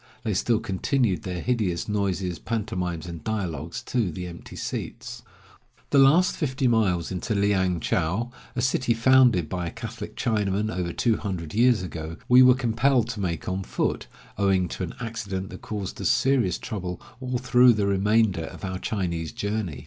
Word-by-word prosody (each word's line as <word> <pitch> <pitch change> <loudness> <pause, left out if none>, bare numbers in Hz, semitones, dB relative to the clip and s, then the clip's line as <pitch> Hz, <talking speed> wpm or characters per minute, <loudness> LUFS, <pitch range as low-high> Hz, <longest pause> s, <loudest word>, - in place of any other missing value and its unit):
They 110 - -1
still 110 +4 +1
continued 115 0 0
their 90 -4 -4
hideous 105 -9 -1
noises, 95 -4 -1
pantomimes, 90 -7 -3
and 85 -2 -8
dialogues 85 -7 -3
to 120 -7 0
the 90 +3 -6
empty 85 -1 -9
seats. - - -5 0.7
The 140 - +5
last 155 +7 +5
fifty 135 -3 0
miles 100 -8 +1
into 95 +4 -2
Liang 95 -3 +2
chou, 95 +10 -1 0.2
a - - 0
city 125 -2 +1
founded 120 -7 +5
by 90 0 -3
a - - -5
Catholic - - -7
Chinaman 105 -1 0
over 90 -2 -2
two 115 +4 +1
hundred 85 -6 -5
years 120 -2 +4
ago, 80 -1 -6
we 125 +1 +7
were 125 -1 +7
compelled 120 0 +2
to 115 -4 -4
make 85 -4 -3
on 95 +1 -1
foot, - - -2 0.3
owing 95 -2 +2
to - - -6
an 90 - -4
accident 105 -5 -4
that 95 - -9
caused 100 -3 -5
us - - +1
serious 125 -10 +2
trouble 90 -6 -5 0.2
all 130 -1 -2
through 125 -1 +5
the 105 -2 0
remainder 100 -2 +2
of - - -8
our 95 -1 -4
Chinese 85 -7 -2
journey. 100 -9 -3
100 Hz, 170 wpm, -25 LUFS, 90-120 Hz, 0.7 s, we